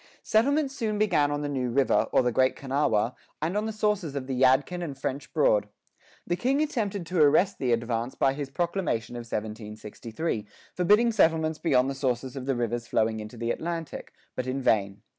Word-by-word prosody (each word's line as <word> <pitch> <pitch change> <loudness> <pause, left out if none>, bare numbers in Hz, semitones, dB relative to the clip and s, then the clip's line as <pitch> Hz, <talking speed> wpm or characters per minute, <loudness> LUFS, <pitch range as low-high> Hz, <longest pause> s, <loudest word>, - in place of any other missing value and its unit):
Settlements 275 +5 +2
soon 220 -5 -1
began 180 -9 +2
on 145 0 -2
the - - -1
New 130 -3 -1
River, 135 +2 +2
or - - +4
the 125 - +1
Great 130 +2 +2
Kanawha, 130 -4 0 0.3
and 160 +5 -2
on 210 +1 0
the - - -2
sources 210 -8 -1
of 135 -2 -3
the 135 - -3
Yadkin 130 +7 +3
and 145 -5 -5
French 135 +1 -4
Broad.[5:4] 105 -9 +2 0.6
The 175 - 0
King 260 +8 +1
attempted 210 - -1
to 175 -1 0
arrest 155 +7 +4
the 125 -2 0
advance 115 +1 -1
by 135 - +2
his 140 -1 -5
proclamation 170 - -2
of 120 -1 -6
1763,[5:5] 110 +3 -5 0.3
forbidding 210 +6 +4
settlements 160 -6 +2
beyond 130 -6 +3
the 135 - -2
sources 130 -1 -2
of 135 -1 -6
the 135 - +1
rivers 120 0 -2
flowing 110 0 +1
into 105 +3 -8
the 115 +1 -1
Atlantic; 165 -2 -5 0.2
but 130 - -3
in 130 +1 -1
vain. 100 -2 +1
140 Hz, 190 wpm, -27 LUFS, 120-175 Hz, 0.6 s, or